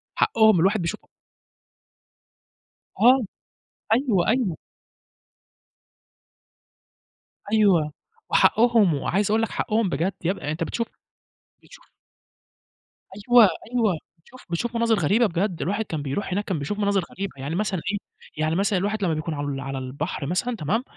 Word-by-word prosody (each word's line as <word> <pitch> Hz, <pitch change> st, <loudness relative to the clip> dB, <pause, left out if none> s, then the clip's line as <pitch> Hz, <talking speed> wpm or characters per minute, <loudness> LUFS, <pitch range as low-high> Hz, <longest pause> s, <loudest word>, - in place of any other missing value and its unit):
حقّهم 225 Hz, -, +3 dB
من -, -, +7 dB
اللي 185 Hz, -, +2 dB
الواحد 195 Hz, +3 st, +2 dB
بيشوف 170 Hz, -2 st, -3 dB, 2.0 s
آه، 250 Hz, +5 st, +6 dB, 0.7 s
أيوه، 230 Hz, -7 st, +2 dB
أيوه. 225 Hz, -, 0 dB, 2.9 s
أيوه 190 Hz, -9 st, +3 dB, 0.4 s
وحقّهم 225 Hz, -6 st, +4 dB
وعايز 195 Hz, +8 st, 0 dB
أقول 220 Hz, +1 st, +2 dB
لك 225 Hz, -, -1 dB
حقّهم 220 Hz, -2 st, 0 dB
بجد 170 Hz, +5 st, -1 dB
يبقى 165 Hz, -4 st, -2 dB
أنت 160 Hz, +2 st, -2 dB
بتشوف، 230 Hz, +8 st, -3 dB, 0.8 s
بتشوف -, -, -17 dB, 1.5 s
أيوه، 245 Hz, -1 st, +8 dB
أيوه 220 Hz, -2 st, +1 dB, 0.3 s
شوف 255 Hz, +6 st, -16 dB
بتشوف 235 Hz, +8 st, -3 dB
مناظر 230 Hz, -1 st, +2 dB
غريبة، 205 Hz, +9 st, +3 dB
بجد 180 Hz, -1 st, -1 dB
الواحد 205 Hz, +4 st, -1 dB
كان 160 Hz, -6 st, -4 dB
بيرُوح 145 Hz, +9 st, -3 dB
هناك 205 Hz, +3 st, -1 dB
كان 185 Hz, -6 st, -2 dB
بيشوف 205 Hz, +9 st, -4 dB
مناظر 200 Hz, -2 st, +1 dB
غريبة 195 Hz, 0 st, -5 dB
يعني 140 Hz, +5 st, -4 dB
مثلًا 190 Hz, -3 st, -1 dB
إيه، 205 Hz, -, -1 dB, 0.4 s
يعني 155 Hz, +1 st, 0 dB
مثلًا 195 Hz, +1 st, +1 dB
الواحد 205 Hz, +2 st, -2 dB
لما 170 Hz, -4 st, +1 dB
بيكون 155 Hz, +1 st, -3 dB
على 145 Hz, -1 st, -4 dB
ال 140 Hz, -1 st, -3 dB
على 135 Hz, 0 st, -5 dB
البحر 140 Hz, +4 st, -4 dB
مثلًا 185 Hz, -, -1 dB
تمام، 215 Hz, -, -1 dB
195 Hz, 135 wpm, -24 LUFS, 160-220 Hz, 2.9 s, أيوه